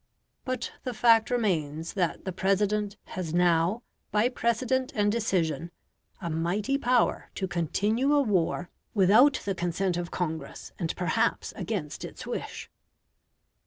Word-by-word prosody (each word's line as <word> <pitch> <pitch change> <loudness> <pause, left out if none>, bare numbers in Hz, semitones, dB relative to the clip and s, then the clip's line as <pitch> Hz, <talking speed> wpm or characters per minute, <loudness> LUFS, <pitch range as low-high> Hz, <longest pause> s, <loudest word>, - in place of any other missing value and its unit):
But 255 -2 -3
the 250 -2 -4
fact 225 -2 +5
remains 165 - -1
that 175 -4 -1
the 190 - -2
President 205 +2 0 0.2
has 175 -3 -3
now, 175 +5 +3 0.3
by 215 +3 +3
precedent 255 +2 0
and 205 -1 +2
decision, 175 -8 0 0.5
a 170 - -5
mighty 175 +10 0
power 250 -2 +2
to 190 - -2
continue 205 - 0
a 290 - +5
war 180 -5 0 0.2
without 220 +8 +5
the 200 - 0
consent 175 +1 -1
of 175 -1 -3
Congress, 160 -3 -4
and 165 -3 -2
perhaps 225 +6 0
against 180 -10 -4
its - - -8
wish. - - -5
195 Hz, 130 wpm, -28 LUFS, 175-230 Hz, 0.5 s, fact